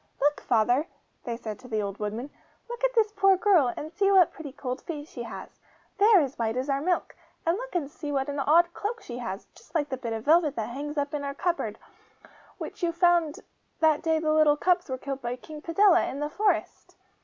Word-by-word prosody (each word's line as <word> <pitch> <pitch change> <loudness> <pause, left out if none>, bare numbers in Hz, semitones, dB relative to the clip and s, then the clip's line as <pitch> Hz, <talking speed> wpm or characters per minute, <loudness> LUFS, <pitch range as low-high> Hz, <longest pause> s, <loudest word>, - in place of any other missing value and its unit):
'Look, 290 +1 +1
father!' 245 +6 +2 0.4
they 235 -1 -3
said 215 -3 -6
to 255 - -13
the 215 -3 -1
old 200 0 -5
woodman, 220 +6 -4 0.4
'look 480 +1 -7
at - - +2
this 435 -2 +3
poor 390 -2 +4
girl, 360 - +4
and 310 +2 -6
see 395 -1 +2
what 375 -3 +5
pretty 300 -4 -8
cold 255 -1 -5
feet 300 -3 -6
she 245 - -8
has. 235 - -9 0.4
They 405 - +5
are 425 -5 +7
as 275 -3 -4
white 225 +1 -1
as 265 +2 -1
our 275 0 0
milk! 355 +3 -1 0.3
And 335 +1 +2
look - - -7
and 320 -5 0
see 295 +1 -7
what 270 -1 0
an 285 0 -3
odd 340 +5 +4
cloak 450 +3 -4
she 240 0 -7
has, 195 -4 -5
just 315 - -20
like 295 -3 +1
the 260 - -3
bit 235 -3 -4
of 225 0 -5
velvet 310 -1 +4
that 220 0 -3
hangs 295 +4 -5
up 285 0 -1
in 290 -1 -2
our 280 0 -4
cupboard, 350 +3 -2 0.5
and - - -20 0.3
which - - -8
you 345 -1 +1
found 340 -3 +2 0.4
that 315 -2 +3
day 320 -1 +1
the 310 -1 +1
little 305 -1 +4
cubs 355 0 +1
were 260 - -2
killed 275 +1 -5
by 240 +1 -3
King 300 +4 -11
Padella, 355 +2 +4
in 275 - -5
the 295 0 -3
forest! 415 +3 -1
295 Hz, 235 wpm, -27 LUFS, 260-345 Hz, 0.5 s, are